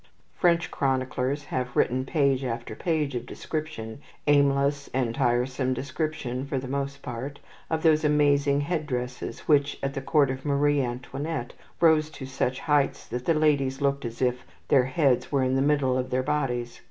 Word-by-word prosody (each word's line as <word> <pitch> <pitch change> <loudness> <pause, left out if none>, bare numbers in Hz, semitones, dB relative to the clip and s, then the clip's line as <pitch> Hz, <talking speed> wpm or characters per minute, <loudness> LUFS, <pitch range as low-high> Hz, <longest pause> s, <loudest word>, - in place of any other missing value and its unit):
French 170 -1 +2
chroniclers 130 +1 -1
have 125 -3 -3
written 130 +2 +2
page 140 -3 +1
after 120 -2 -4
page 155 -3 -1
of 120 0 -4
description 150 -7 -5 0.2
aimless 140 0 +3
and 125 -3 0
tiresome 125 +2 +1
description, 140 -2 -3
for 140 - -2
the 130 0 -4
most 140 +1 -3
part 130 +4 -6 0.3
of 160 -1 -1
those 155 -1 +4
amazing 145 -1 +3
head 155 0 -2
dresses 125 -2 -4
which, 145 -2 +2
at 135 0 -1
the 135 - -3
court 140 -1 +3
of 130 0 -6
Marie 145 0 +2
Antoinette, 130 +2 -4 0.3
rose 160 -2 +4
to 140 - -8
such 130 -1 -2
heights 145 -2 +1
that 125 +1 -5
the 165 - +3
ladies 140 -4 +2
looked 140 -1 0
as 120 +1 -4
if 125 0 0 0.3
their 130 -3 +5
heads 130 -1 +1
were 140 -2 +2
in 130 0 +1
the 135 - +2
middle 140 -3 +2
of 130 0 -1
their 130 0 0
bodies. 125 -4 -2
140 Hz, 170 wpm, -26 LUFS, 130-145 Hz, 0.3 s, their